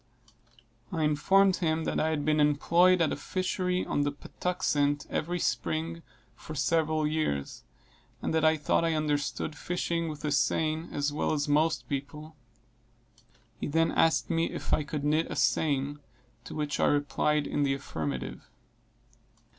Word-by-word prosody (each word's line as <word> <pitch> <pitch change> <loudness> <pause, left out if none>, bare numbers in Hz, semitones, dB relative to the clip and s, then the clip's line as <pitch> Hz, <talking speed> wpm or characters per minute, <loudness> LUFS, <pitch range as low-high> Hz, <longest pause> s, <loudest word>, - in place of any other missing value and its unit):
I 160 -3 -1
informed 190 +6 +3
him 160 -2 0
that - - -1
I 155 - +1
had 150 -2 -1
been 155 0 +2
employed 170 +5 +4
at 160 - +1
a - - -1
fishery 185 +3 -1
on - - 0
the 145 0 +1
Patuxent, 145 -2 -1
every 175 +3 -1
spring, 165 0 -2 0.3
for 155 - -9
several 155 0 +1
years; 150 - -2 0.6
and - - -2
that 160 -1 +2
I 155 0 +4
thought 150 +2 +1
I 165 -1 +1
understood 150 0 -1
fishing 170 0 -2
with 150 0 -6
a 150 - 0
seine, 155 +3 +1
as 145 0 -1
well 150 - 0
as 145 -1 -1
most 155 +2 +1
people. 150 +3 -5 1.2
He - - -3
then 165 +2 +2
asked 165 +1 +2
me 165 0 +1
if - - -4
I - - +3
could 150 -1 -4
knit 155 +2 +1
a - - -4
seine, 145 -1 +1 0.5
to - - -8
which 150 -1 -2
I - - +4
replied 145 +1 +1
in 145 - -1
the 135 -1 +2
affirmative. 75 - -5
155 Hz, 155 wpm, -29 LUFS, 145-165 Hz, 1.2 s, employed